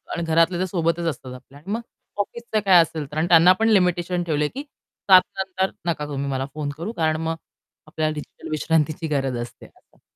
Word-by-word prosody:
आणि 170 - -2
घरातले 165 +2 +2
तर 185 - +1
सोबतच 170 -1 -1
असतात 130 -4 -5
आपल्या 130 +2 -14
आणि 190 +7 -8
मग 230 - -2 0.4
ऑफिसचं 225 +1 -3
काय 180 -3 +7
असेल 155 -1 -3
तर. 150 - -6
आणि 160 +2 +1
त्यांना 175 +1 +7
पण 225 - +3
लिमिटेशन 180 -3 +2
ठेवलंय 150 -3 0
की 280 - -4 0.5
7:00 185 0 +10 0.2
नंतर 190 0 -1 0.2
नका 150 -2 -2
तुम्ही 140 -1 -3
मला 135 0 -1
फोन 150 -2 -3
करू, 175 +7 -4
कारण 155 -3 0
मग 165 0 -1 0.5
आपल्याला 155 -1 -1
डिजिटल 150 -1 -9
विश्रांतीची 155 +1 0
गरज 135 -4 -1
असते. 120 - -9
असं. - - -24
165 Hz, 195 wpm, -23 LUFS, 150-180 Hz, 0.5 s, 7:00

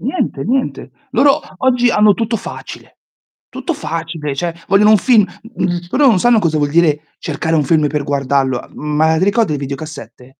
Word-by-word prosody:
Niente 260 - -2
niente. 260 +5 -2 0.2
Loro 280 -1 +3 0.2
oggi 245 -1 +2
hanno 210 -2 +4
tutto 230 +3 -1
facile. - - -10 0.5
Tutto 340 - -4
facile, 165 - -5
cioè 170 +3 -3
vogliono 205 +2 +4
un 215 - +7
film, 220 -1 +4
mh 225 0 -10
mhmm, 175 -1 0
loro 285 +1 +3
non 220 -7 +5
sanno 240 +3 +4
cosa 165 -6 0
vuol 145 -1 0
dire 150 -2 +1
cercare 160 0 -2
un 155 -2 +2
film 155 +1 +2
per 145 0 -2
guardarlo. 135 -2 -1
Ma 155 +2 +1
ti 185 - +2
ricordi 205 -5 +1
i - - -1
videocassette? 135 -3 -8
165 Hz, 180 wpm, -16 LUFS, 150-225 Hz, 0.5 s, un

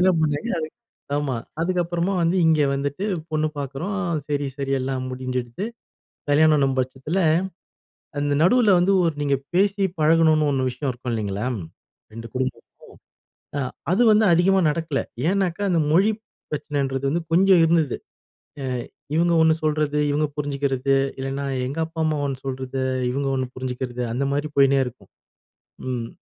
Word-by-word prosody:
என்ன 185 +1 +5
பண்ணாங்க. 150 +8 0
அது 155 0 -3 0.5
ஆமா. 145 -3 -1 0.3
அதுக்கப்புறமா 175 +1 0
வந்து 170 +3 +2
இங்கே 155 -2 +4
வந்துட்டு 140 +7 -2 0.3
பொண்ணு 155 0 +1
பார்க்குறோம். 145 +9 -3 0.3
சரி, 145 -1 -1
சரி 135 -1 -2
எல்லாம் 130 0 -2
முடிஞ்சுருது. 125 - -4 0.7
கல்யாணம் 145 -3 +4
பட்சத்தில, 130 +7 -2 1.0
அந்த 145 0 0
நடுவுல 220 +4 +5
வந்து 180 +3 +3
ஒரு 165 -2 +1
நீங்க 140 -1 +2 0.2
பேசி 200 +2 +2 0.2
பழகணும்னு 155 -1 +4
ஒரு 130 -1 0
விஷயம் 130 +2 -3
இருக்கும் 125 0 -6
இல்லைங்களா. 105 0 -2 0.7
2 115 0 -7
குடும்பமும் 130 0 -2 1.0
அ - - 0 0.3
அது 195 +7 +3
வந்து 215 0 +5
அதிகமா 190 +3 +4
நடக்கல. 160 -3 -1 0.3
ஏன்னாக்கா? 195 0 0
அந்த 170 - +2
மொழி 190 +7 +4 0.4
பிரச்சனைன்றது 140 -3 -2
வந்து 170 +4 0
கொஞ்சம் 185 0 +5
இருந்தது. 160 -5 +2 0.7
அ - - -2 0.5
இவுங்க 170 +1 +3
1 160 0 +5
சொல்றது, 150 -1 +1
இவுங்க 150 +1 +1
புரிஞ்சுக்கிறது. 140 -2 0 0.2
இல்லைன்னா 135 +1 -3 0.2
எங்க 140 +5 -4
அப்பா, 160 0 -9
அம்மா 155 -1 +1
1 135 -1 -3
சொல்றது, 130 0 -3 0.3
இவுங்க 135 +1 -1
1 130 -1 -1
புரிஞ்சிக்கிறது. 125 -1 -4
அந்த 140 +3 0
மாரி 145 +2 -1
போயிட்டே 140 0 +5
இருக்கும். 115 -6 -10 0.8
ம். 120 -2 -3
145 Hz, 140 wpm, -23 LUFS, 130-170 Hz, 1.0 s, என்ன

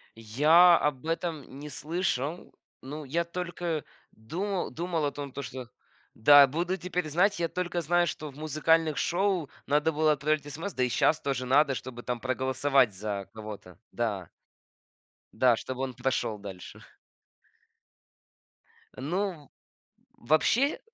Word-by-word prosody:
Я 155 +11 +5
об 145 -2 -1
этом 165 -5 -4
не 150 +1 -7
слышал, 155 0 -3 0.3
ну, 150 +4 -7
я 165 +6 0
только 170 -2 -4 0.3
думал 180 - -3
думал 170 -2 -2
о 145 - 0
том, 140 -1 -7
то 140 - -6
что 130 -2 -7 0.4
да, 145 +5 +8
буду 170 +7 -2
теперь 180 -3 -3
знать. 180 +6 +2
Я 170 - +1
только 175 0 -2
знаю, 175 +2 +2
что 155 -2 -5
в 140 - -14
музыкальных 155 +1 +1
шоу 180 -4 0 0.2
надо 150 +3 +2
было 155 0 +2
отправлять 150 0 0
СМС, 170 +6 -5
да 130 - 0
и 125 - +1
сейчас 155 +5 +2
тоже 130 -2 -2
надо, 140 +2 +4
чтобы 125 -1 -7
там 125 -1 -3
проголосовать 130 0 +1
за 100 0 -4
кого-то, 105 -4 -9
да. 105 -7 -3 1.0
Да, 125 -2 +4
чтобы 130 +1 -5
он 130 -2 -3
прошел 115 -4 -1
дальше. 95 -3 -10 2.1
Ну, 170 +1 -3 0.7
вообще, 190 - +2
150 Hz, 135 wpm, -28 LUFS, 130-170 Hz, 2.1 s, да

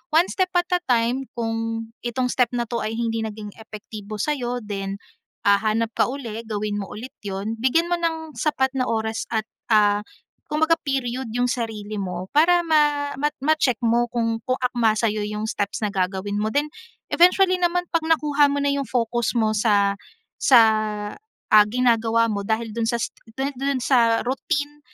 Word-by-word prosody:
one 340 +3 +5
step 375 -1 0
at 350 - +1
a 360 - +3
time. 245 +2 +1
Kung 225 0 -2 0.2
itong 250 +1 -1
step 250 -3 +2
na 240 - 0
‘to 235 - -2
ay 215 - -2
hindi 230 -1 -1
naging 210 -1 -7
epektibo 215 -1 -9
sa’yo, 245 -1 -1
then, 195 -1 -4 0.5
ah, 200 0 +6
hanap 220 +1 0
ka - - +3
uli, 240 -5 -5
gawin 210 -1 -2
mo 195 - -5
ulit 235 +5 -8
‘yon. 200 +3 -3
Bigyan 325 +8 +2
mo 350 - +2
ng 320 -2 -3
sapat 265 -4 +1
na 255 - +1
oras 220 0 -1
at, 220 -1 +1 0.3
ah, 205 -1 +4 0.5
kumbaga 315 +2 +3
period 260 -3 -2
'yong 245 0 +2
sarili 215 -3 -4
mo 180 -1 -4
para 345 +4 +5
ma 295 -2 +2
ma 295 - +3
ma-check 290 -5 +2
mo 240 +1 +2
kung 230 -1 -1
kung 255 - +2
akma 240 -3 +2
sa’yo 215 -1 0
yung 210 +1 -3
steps 205 +1 -2
na 210 - +1
gagawin 195 +1 -1
mo. 215 - 0
Then, 290 +5 0 0.4
eventually 370 +2 +5
naman 355 0 +1
'pag 335 -1 +1
nakuha 295 -3 +3
mo 285 - 0
na 285 - +2
yung 280 -1 -1
focus 240 -1 0
mo 220 -1 +2
sa 205 -2 +2 0.4
sa, 250 -3 +7 0.9
ah, 210 -1 +8
ginagawa 230 -1 +2
mo 200 -1 -2
dahil 220 0 -1
do’n 230 0 -1
sa 235 - +1 0.4
do 265 - -1 0.2
do’n 275 -1 0
sa 230 -4 +3
routine 285 +3 -2
235 Hz, 175 wpm, -23 LUFS, 215-280 Hz, 0.9 s, ah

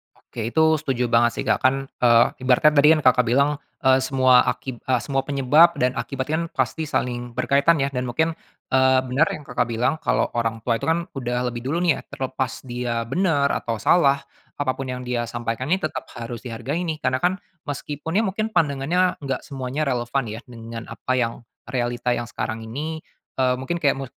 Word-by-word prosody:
Oke 115 -1 -7
itu 160 +6 +2 0.2
setuju 125 -5 -1
banget 120 0 +4
sih - - -3
Kak - - +1
kan, 130 +1 +3 0.2
eee, 120 -1 +6
ibaratnya 130 +4 +4
tadi 150 0 +5
kan 155 - -1
Kakak 125 -1 +4
bilang, 140 +4 +2 0.2
eee, 130 0 +5
semua 130 -1 +4
aki 125 0 -3
eee, 130 -2 0
semua 135 -2 -2
penyebab 145 +5 +5
dan 125 0 +1
akibat 130 -2 -3
kan 165 +2 0
pasti 160 -2 -1
saling 120 -3 -2
berkaitan 140 +4 +3
ya 140 - -1
dan 125 -1 -2
mungkin, 160 +7 +1 0.4
eee, 130 0 +4
bener 130 +6 +2
yang 150 - -10
Kakak 125 -3 -1
bilang 120 +4 +1
kalau - - 0
orang 115 -1 -1
tua 115 -1 0
itu - - -4
kan 165 +1 +2
udah 125 -3 -3
lebih 120 - -5
dulu 170 +5 0
nih 170 - +2
ya - - -9
terlepas 130 -1 -3
dia 120 -2 -2
bener 145 +1 +1
atau 115 - -3
salah, 140 - +3 0.3
apa 145 -2 0
pun 130 +1 -6
yang 125 0 -5
dia 120 -1 -2
sampaikan 120 +1 -3
ini 185 +3 +1
tetap 155 - -3
harus 115 0 -6
dihargai 125 +7 -4
ini 160 - -1
karena 130 0 +1
kan 180 +4 +1 0.3
meskipun 145 +3 -5
ya 220 - +4
mungkin 215 +2 -1
pandangannya 160 +5 +1
nggak 135 -2 -3
semuanya 135 +1 -3
relevan 125 0 -1
ya 110 - -6
dengan 115 -1 -8
apa - - -5
yang 115 0 -2 0.2
realita 120 -1 -1
yang 120 - -3
sekarang 115 -1 -4
ini, 155 +8 -5 0.3
eee, 130 -1 +2
mungkin 170 +6 -3
kayak 140 -1 +3
mu 135 - -4
130 Hz, 195 wpm, -23 LUFS, 120-145 Hz, 0.4 s, eee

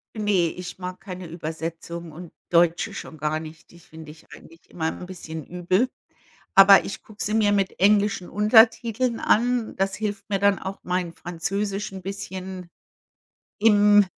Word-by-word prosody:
Ne, 205 -6 +1
ich 180 0 -8
mag 180 0 -7
keine 185 -2 -8
Übersetzung 165 +1 -6
und 170 +2 -10 0.2
deutsche 170 0 +3
schon 160 - -8
gar 155 +1 -1
nicht. 160 0 -12
Die 175 - -16
finde 160 -2 -12
ich 155 +1 -19
eigentlich 165 0 -16
immer 160 -2 -5
'n 180 - -9
bisschen 160 -4 -8
übel. 180 - 0 0.7
Aber 195 0 +8
ich - - -7
gucke 215 -1 -7
sie 210 - -2
mir 215 -2 +3
mit 195 -2 -1
englischen 200 -2 +3
Untertiteln 225 +2 +3
an. 240 0 +1
Das 195 0 0
hilft 205 -2 -4
mir 200 -1 0
dann 200 0 +3
auch 190 +1 -6
mein 180 -2 -2
Französisch 195 +4 -3
'n 190 -1 -8
bisschen, 190 -1 -7 0.9
im 205 -1 +6
190 Hz, 155 wpm, -24 LUFS, 170-205 Hz, 0.9 s, Aber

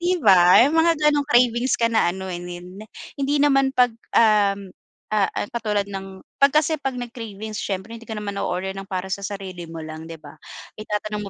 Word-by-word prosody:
‘Di 360 +1 +1
ba 180 +4 +7
yung 305 +4 +1
mga 335 0 +4
ganong 295 -1 +1
cravings 240 0 +3
ka 230 - +2
na 220 - +3
ano 190 0 -6
eh, 175 - -5 0.8
hindi 280 +1 0
naman 275 -2 +3
‘pag, 245 -2 +4 0.2
um, 200 -3 +3 0.4
ah, 205 -2 +2
ah, - - -1
katulad 210 -4 -1
ng 195 -1 -8 0.2
‘pag 280 - +6
kasi 310 +1 +3
‘pag 270 -2 -3
nag-cravings 220 -3 -7
siyempre 195 +3 -4
hindi 230 - -15
ko 220 - -4
naman 205 -1 -5
na-order 185 +1 -2
ng 195 - -7
para 190 -1 -4
sa 200 - -3
sarili 190 -3 -7
mo 165 - -7
lang 155 +1 -8
‘di 165 - -7
ba. 145 0 -13 0.4
Itatanong 210 -1 -4
210 Hz, 190 wpm, -22 LUFS, 190-250 Hz, 0.8 s, ba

